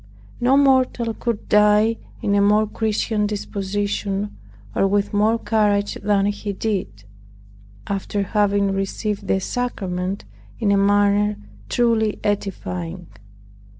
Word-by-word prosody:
No 255 +3 +4
mortal 260 -4 +3
could 230 -1 -3
die 210 +2 +4 0.3
in 200 - +1
a 200 - +4
more 210 +2 +4
Christian 215 0 -1
disposition, 205 0 -3 0.4
or 195 - +2
with 205 +1 0
more 215 +3 +3
courage 205 -3 +1
than 200 -1 +2
he 205 0 -2
did, 190 - -3 0.8
after 200 +1 -2
having 200 0 +1
received 195 +2 -3
the 190 - +2
sacrament 190 -4 -3 0.3
in 210 -4 +1
a - - +4
manner 205 +1 +3 0.3
truly 225 -3 +1
edifying. 180 -4 -3
205 Hz, 115 wpm, -21 LUFS, 200-215 Hz, 0.8 s, No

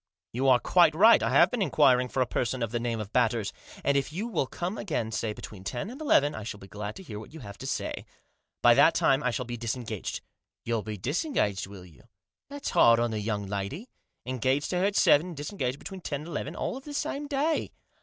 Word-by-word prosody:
" - - -66
You 130 +3 0
are 130 -2 +6
quite 170 +2 +4
right, 215 - +7
I 115 - +1
have 170 +8 +5
been 245 - -2
inquiring 130 -7 +4
for 130 - -1
a - - -4
person 125 0 -2
of 115 - -3
the 120 - -1
name 115 -1 -2
of 105 -1 -7
Batters. 115 -4 +1 0.3
And 140 - +2
if 140 +1 0
you 195 +9 -3
will 215 - -1
come 180 - -4
again, 145 - -2
say, 110 0 -2
between 105 -2 -9
ten 120 - -4
and 270 +5 -10
eleven, 145 - +3
I 110 - -6
shall 105 -1 -6
be 95 - -12
glad 105 +2 -6
to 190 - -10
hear 105 - -7
what 110 +8 -12
you 160 - -9
have 100 -3 -10
to 135 - -6
say. - - -3 0.6
By - - +8
that - - +5
time 135 +1 +3
I 125 - +1
shall 125 +1 -3
be 120 0 -5
disengaged." 115 -3 -4 0.2
" - - -63
You'll 115 -2 0
be 105 +1 -6
disengaged, 120 - -1
will 95 -2 -11
you? 85 -4 -18 0.5
That's 285 0 -5
hard 115 0 +6
on 120 -1 0
the 110 - -2
young 105 -1 -2
lady. 100 - -5 0.3
Engaged 130 +3 0
to 180 - 0
her 185 - +2
at 200 0 0
seven, 155 +5 +5
and 170 -4 -8
dis 145 +1 -5
engaged 130 -9 -2
between 190 +5 -8
ten 145 -4 -4
and 160 - -9
eleven, 155 -1 -4
all 255 - -3
of 270 - -11
the 290 0 -8
same 290 0 -3
day." 295 +3 0
130 Hz, 250 wpm, -28 LUFS, 110-175 Hz, 0.6 s, By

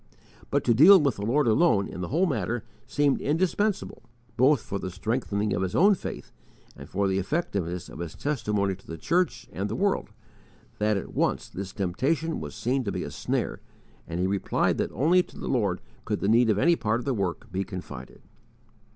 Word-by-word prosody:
But - - +1
to 120 - +4
deal 175 - +9
with 140 -6 +1
the 100 - -3
Lord 145 +5 +3
alone 110 - +3
in 90 - -7
the 90 - -3
whole 170 +6 +2
matter 120 - -1 0.2
seemed 145 +2 +2
so - - -8
indispensable, 185 +6 0 0.3
both 135 +1 +4
for 100 - -4
the 95 - -4
strengthening 105 +1 -1
of 90 - -1
his 95 -1 -2
own 200 +4 +6
faith 190 - -6 0.4
and - - -11
for 100 +1 0
the 95 0 +1
effectiveness 95 - -2
of - - -11
his 85 -2 -5
testimony 105 -9 -1
to 95 - -14
the 80 - -6
church 150 - 0
and 100 +3 -3
the 110 - -3
world, 200 +8 0 0.7
that 105 0 +2
at 95 - -6
once - - 0
this 95 0 -6
temptation 135 - -1
was - - -7
seen 130 +2 0
to 100 - -2
be - - -3
a - - -6
snare, - - -2 0.5
and 85 +1 -4
he 90 - +1
replied 95 0 0
that - - -1
only 165 - +4
to - - -13
the - - -6
Lord 100 -8 0 0.2
could 105 - -2
the - - -1
need 115 +2 +4
of 105 - +3
any 170 +10 +4
part 115 -5 0
of - - -7
the 135 - +1
work 95 -6 -3
be 95 +2 -1
confided. 90 -3 -9
110 Hz, 205 wpm, -27 LUFS, 95-145 Hz, 0.7 s, deal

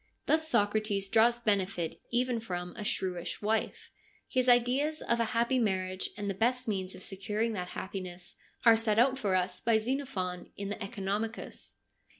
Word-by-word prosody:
Thus 315 0 +2
Socrates 205 -6 +1
draws 230 +2 +5
benefit 200 -7 0
even 245 0 +1
from 180 -5 -5
a 215 - -5
shrewish 180 -3 -2
wife. 215 +1 -1 0.4
His 255 0 +1
ideas 255 +6 +3
of 235 0 +1
a 230 - +3
happy 240 +2 +3
marriage, 185 -4 0
and 205 -1 -3
the 195 - 0
best 245 +5 +1
means 190 -3 -2
of 185 - -10
securing 210 +4 -1
that 180 -3 -3
happiness, 185 -2 -6 0.3
are 230 -1 +9
set 220 -1 +1
out 260 +3 +4
for 195 -5 +1
us 180 0 -1
by 230 -1 +4
Xenophon 220 -7 -2
in 200 0 -4
the 205 - -2
CEconomicus. 210 +2 -4
215 Hz, 160 wpm, -31 LUFS, 190-235 Hz, 0.4 s, are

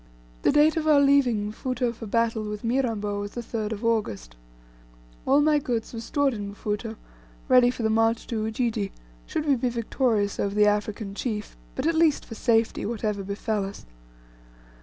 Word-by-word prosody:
The - - +3
date 300 +2 +4
of 315 -1 -1
our 300 -2 +6
leaving 270 -7 +3
Mfuto 245 +1 -2
for 225 -1 -9
battle 230 0 +1
with 210 0 -6
Mirambo 225 -5 0
was 205 0 -5
the 240 - -4
3rd 220 -2 -3
of 220 +2 -6
August. 110 - -1 0.9
All 275 +2 +5
my 300 0 +4
goods 240 -5 -3
were 225 - -5
stored 280 +3 +1
in 205 -2 -6
Mfuto, 210 +2 -3 0.5
ready 250 -1 +6
for 245 -2 -4
the 220 - +2
march 225 +1 +2
to 220 -2 -2
Ujiji, 220 -2 -1 0.4
should 305 - -2
we 285 -2 +4
be 250 0 0
victorious 230 -3 0
over 200 0 -1
the 210 0 +5
African 210 0 -1
chief, 210 -1 -4 0.2
but 260 - -2
at 330 - +3
least 320 -2 +3
for - - -9
safety, 225 0 +1
whatever 210 -2 -2
befel 200 +1 -2
us. 195 +1 -8
225 Hz, 180 wpm, -26 LUFS, 210-255 Hz, 0.9 s, our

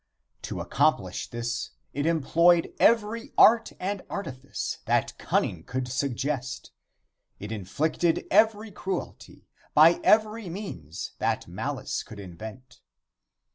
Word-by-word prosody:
To - - -5
accomplish - - 0
this 120 +1 -3 0.2
it 145 +3 -1
employed 170 +2 +3
every 230 +3 +2
art 225 +1 +6
and 195 +1 -2
artifice 135 -9 -5
that - - +1
cunning 85 - 0
could 130 +4 -3
suggest 130 0 -3 0.7
It 105 +2 -7
inflicted 150 - 0
every 215 +1 +3
cruelty 190 0 -6 0.3
by 160 +3 +7
every 215 -2 +3
means 90 - -6
that - - -1
malice - - -3
could 105 - -11
invent. 110 +8 -10
155 Hz, 105 wpm, -27 LUFS, 125-205 Hz, 0.7 s, by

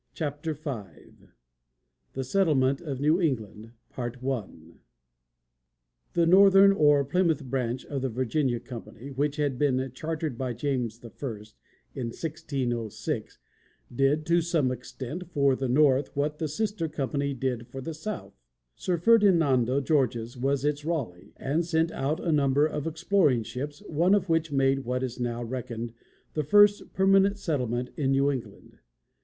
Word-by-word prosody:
CHAPTER 150 0 -3
V 130 - -9 0.8
THE 135 - -3
SETTLEMENT 140 -4 +2
OF 140 -6 -5
NEW 155 +5 +3
ENGLAND 115 - -2 2.4
The 170 - +3
Northern 195 +2 +7
or 145 -6 +4
Plymouth 160 0 +1
Branch 125 -1 -2
of 140 -2 -4
the 135 - -1
Virginia 130 +1 0
Company, 125 +2 -9
which 145 +2 -1
had 145 -4 -1
been 130 -2 +1
chartered 155 -2 -4
by 130 -2 -2
James 120 -3 -2
I 115 - -8 0.8
in 125 -3 -4
1606, 120 -5 -4 0.6
did, 140 +4 +2
to 170 +1 +3
some 160 -6 +1
extent, 130 +7 -7
for 140 -5 +2
the 130 -1 -2
north 135 0 +3
what 150 +1 -1
the 160 - -1
sister 200 +1 -2
company 140 -1 -2
did 125 -2 -2
for 135 +1 -8
the 160 +5 -5
south. 205 +7 -6 0.4
Sir 180 -2 -1
Ferdinando 160 - +4
Gorges 125 -5 0
was 135 +2 0
its 150 0 0
Raleigh, 140 - -4
and 150 +5 0
sent 165 0 +1
out 140 +4 -1
a 170 - -1
number 145 -1 +3
of 150 -1 -3
exploring 160 - +2
ships, 145 - -6
one 170 +5 +3
of 195 -3 -1
which 165 -1 +1
made 135 -1 +2
what 125 0 -2
is 125 -1 -4
now 120 -1 -2
reckoned 120 -1 -5 0.4
the 155 - -1
first 205 +6 +4
permanent 195 +1 +4
settlement 125 - -2
in 140 -3 0
New 135 +1 +3
England. 130 -4 -8
140 Hz, 140 wpm, -27 LUFS, 130-160 Hz, 2.4 s, Northern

